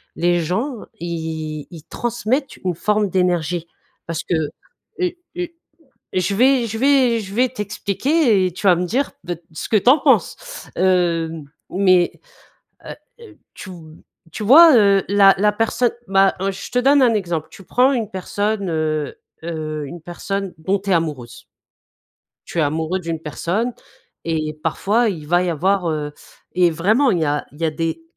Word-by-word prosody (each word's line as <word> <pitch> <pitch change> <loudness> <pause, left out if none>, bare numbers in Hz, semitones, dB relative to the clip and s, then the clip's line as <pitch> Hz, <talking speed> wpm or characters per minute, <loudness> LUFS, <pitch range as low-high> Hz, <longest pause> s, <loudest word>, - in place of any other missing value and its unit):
Les 175 0 +2
gens, 230 - -2 0.2
ils 160 -3 -5
ils 165 -3 -11
transmettent 240 - -2
une 180 -2 -2
forme 210 +3 +1
d'énergie, 175 -2 0 0.4
parce 165 -1 -3
que, - - -3 0.7
heu, 360 -2 +1 0.3
heu, 355 -1 -2 0.7
et 185 - +2
je 185 +3 -1
vais 255 +2 +3
je 225 0 -5
vais 260 -3 +3
je 195 -2 -8
vais 250 +3 +3
t'expliquer, 220 - 0
et 180 - -3
tu 195 +4 -5
vas 180 -2 +6
me 180 - -1
dire, 260 +10 -1
ben, 175 -2 -4
ce 155 - -6
que 220 - +4
tu 210 - +2
en 290 - +6
penses! - - +2 0.4
Heu, 175 -3 +2 0.4
mais 185 -2 +3 0.7
heu - - -8 0.3
heu, 410 -9 -14 0.2
tu 190 - -9
v 160 -3 -12 0.4
tu - - -6
vois, 295 +6 +8
heu, 200 -3 +4
la 195 0 +6
la 210 +1 +3
personne, 225 +3 0 0.2
bah, 195 0 +4
heu, 195 - +1
je 190 - -8
te 250 - 0
donne 275 +3 +4
un 240 -3 +4
exemple, 170 -6 -2
tu 195 - -14
prends 255 +8 +3
une 225 -5 -2
personne, 200 +2 -2
heu 155 -2 -2 0.3
heu, 155 -3 -4
une 170 +3 -9
personne 195 +3 -4
dont 190 +5 0
tu 195 +1 -5
es - - +4
amoureuse 150 -8 -3 1.0
tu - - -6
es 160 - +4
amoureux 160 +5 -1
d'une 165 -2 -4
personne 180 +10 -2 0.5
et 155 -2 -2
parfois, 210 +8 +1
il 160 -7 -5
va 175 +3 +3
y 180 - 0
avoir, 180 +3 +1
heu, 150 -1 -3 0.4
et 180 -1 +3
vraiment, 215 - +2
il 180 - +1
y 160 - +2
a 145 0 -1
il 145 - -16
y - - 0
a 160 - +2
des 165 - -3
185 Hz, 175 wpm, -20 LUFS, 165-225 Hz, 1.0 s, vois